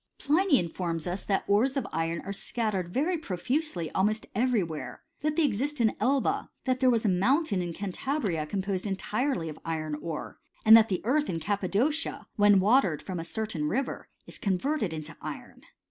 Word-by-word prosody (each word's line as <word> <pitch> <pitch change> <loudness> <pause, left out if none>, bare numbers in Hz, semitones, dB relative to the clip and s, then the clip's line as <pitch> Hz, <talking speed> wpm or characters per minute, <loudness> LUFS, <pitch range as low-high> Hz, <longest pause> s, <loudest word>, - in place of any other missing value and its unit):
Pliny 315 +1 +3
informs 170 -2 -2
us, 180 +2 -3
that 195 - 0
the 200 - +2
ores 260 +7 +2
of 275 - -1
iron 165 +1 -1
are 200 - -5
scattered 200 -4 -2
very 320 - 0
profusely 225 - -2
almost 215 +3 +1
every 235 -1 +2
where: 160 -3 -7 0.2
that 305 0 0
they 325 - +3
exist 280 +4 -1
in 220 -2 +3
Elba; 280 +10 +1 0.2
that 255 -1 +1
there 260 -1 +4
was 230 -2 +2
a - - +4
mountain 205 - +2
in 175 -1 -3
Cantabria 195 - -2
com 195 -2 -2
posed 195 0 -2
entirely 205 - -1
of 155 - -7
iron 155 -2 -3
ore; 160 -1 -6 0.3
and 220 +1 +10
that 225 0 +6
the 185 - -1
earth 290 +7 +1
in 165 - -1
Cap 200 +5 -1
padocia, 280 - 0
when 205 -1 +6
watered 195 - +3
from 185 -3 -4
a - - -3
certain 175 -4 -3
river, 265 - -2 0.2
is - - -9
coiivert 265 +11 0
ed 190 - 0
into 155 -1 -6
iron. - - -8
205 Hz, 190 wpm, -28 LUFS, 180-265 Hz, 0.3 s, and